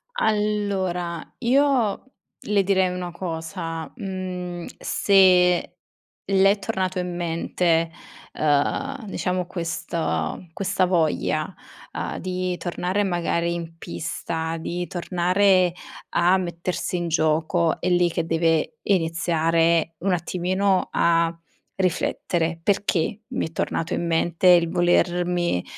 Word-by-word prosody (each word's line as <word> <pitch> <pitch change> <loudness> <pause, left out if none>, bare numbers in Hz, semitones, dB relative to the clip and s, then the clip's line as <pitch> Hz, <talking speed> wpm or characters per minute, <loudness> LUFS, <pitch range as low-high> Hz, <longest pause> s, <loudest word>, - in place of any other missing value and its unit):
Allora, 200 - -1
io 260 -3 +2 0.4
le 205 -1 +1
direi 190 -1 +2
una 180 -1 -4
cosa: 165 -3 -5
mhmm, 180 -3 -5
se 180 -3 +4 0.6
le 195 0 +5
è 205 - -1
tornato 185 -1 -2
in 180 -1 -3
mente, 165 0 0 0.4
uhm, 155 - 0
diciamo 180 -2 -2
questa 165 - -2 0.2
questa 190 0 +1
voglia, 160 -1 0 0.4
uhm, - - -4
di 185 -1 -2
tornare 180 +3 -1
magari 170 -2 0
in 165 -1 -6
pista, 165 0 -4
di 175 +2 -3
tornare 180 +1 +2 0.4
a 180 +2 +3
mettersi 180 +1 -3
in 175 -1 -2
gioco, 160 +1 +1
è 180 - -1
lì 175 -1 +3
che 165 0 -1
deve 165 +6 +1
iniziare 165 -2 +2
un 190 +1 0
attimino 185 +2 0
a 165 0 +2 0.4
riflettere. 170 -2 0
"Perché 195 +1 0
m'è 245 -10 -3
tornato 165 0 -2
in - - -2
mente 170 +2 +1
il 170 -2 +6
volermi, 175 - +1
175 Hz, 105 wpm, -23 LUFS, 165-185 Hz, 0.6 s, il